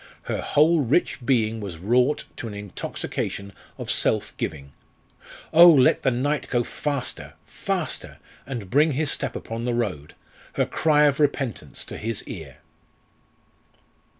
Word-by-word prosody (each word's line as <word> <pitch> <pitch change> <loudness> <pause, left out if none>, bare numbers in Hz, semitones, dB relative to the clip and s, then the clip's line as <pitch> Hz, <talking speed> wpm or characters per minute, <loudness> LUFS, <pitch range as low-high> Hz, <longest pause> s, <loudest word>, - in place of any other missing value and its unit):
Her - - -3
whole 160 +3 +4
rich 145 +1 +1
being 115 -3 +1
was 100 -6 -6
wrought 125 - +2
to 120 - -5
an 105 - -7
intoxication 100 0 -5 0.2
of - - -2
self - - 0
giving. 70 -3 -5 0.8
Oh! 170 +2 +10
let 140 -6 +5
the - - +3
night 140 +4 -1
go 120 -1 +1
faster! 140 +1 -4
faster! - - -4 0.3
and 115 -8 -6
bring 150 +3 +4
his 145 +2 0
step 135 -4 -2
upon 115 +1 -5
the 120 -1 0
road, 90 -11 -3 0.4
her - - +1
cry 150 -2 +3
of 145 -1 +3
repentance 140 -5 -1
to - - -7
his 110 -1 -3
ear. - - -9
125 Hz, 140 wpm, -24 LUFS, 110-145 Hz, 0.8 s, Oh